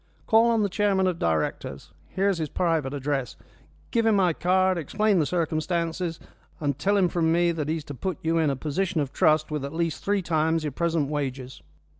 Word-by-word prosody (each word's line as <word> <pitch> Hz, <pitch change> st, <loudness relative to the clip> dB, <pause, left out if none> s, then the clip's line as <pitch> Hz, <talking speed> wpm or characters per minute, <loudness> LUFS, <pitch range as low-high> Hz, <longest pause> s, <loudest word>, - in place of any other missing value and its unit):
"Call 225 Hz, +1 st, +5 dB
on 225 Hz, -2 st, +2 dB
the -, -, +2 dB
chairman 195 Hz, -1 st, +1 dB
of 180 Hz, -2 st, -1 dB
directors 80 Hz, -1 st, -2 dB, 0.2 s
here 195 Hz, +1 st, -1 dB
is 195 Hz, -4 st, +1 dB
his 155 Hz, -2 st, -2 dB
private 165 Hz, -6 st, 0 dB
address 140 Hz, -2 st, -2 dB, 0.6 s
give 230 Hz, -1 st, +2 dB
him 220 Hz, -, +4 dB
my 185 Hz, -4 st, +3 dB
card, 185 Hz, +1 st, +2 dB
explain 205 Hz, +5 st, +1 dB
the 150 Hz, -, +1 dB
circumstances, 170 Hz, 0 st, -1 dB, 0.4 s
and 145 Hz, -2 st, -2 dB
tell 200 Hz, +5 st, +2 dB
him 190 Hz, -2 st, +4 dB
from 165 Hz, -1 st, +1 dB
me 170 Hz, +1 st, +3 dB
that 155 Hz, -3 st, -3 dB
he 160 Hz, -, 0 dB
is 155 Hz, -, -7 dB
to 145 Hz, -, -8 dB
put 185 Hz, +6 st, -3 dB
you 165 Hz, +1 st, +1 dB
in 155 Hz, -2 st, +2 dB
a 140 Hz, -, 0 dB
position 160 Hz, +5 st, -2 dB
of 140 Hz, -2 st, -2 dB
trust, 155 Hz, 0 st, +2 dB
with 150 Hz, -2 st, -2 dB
at 140 Hz, +3 st, -5 dB
least 165 Hz, -2 st, -2 dB
three 200 Hz, -1 st, 0 dB
times 160 Hz, -1 st, +1 dB
your 150 Hz, -, -2 dB
present 165 Hz, 0 st, 0 dB
wages." 135 Hz, -3 st, -4 dB
165 Hz, 210 wpm, -25 LUFS, 150-185 Hz, 0.6 s, Call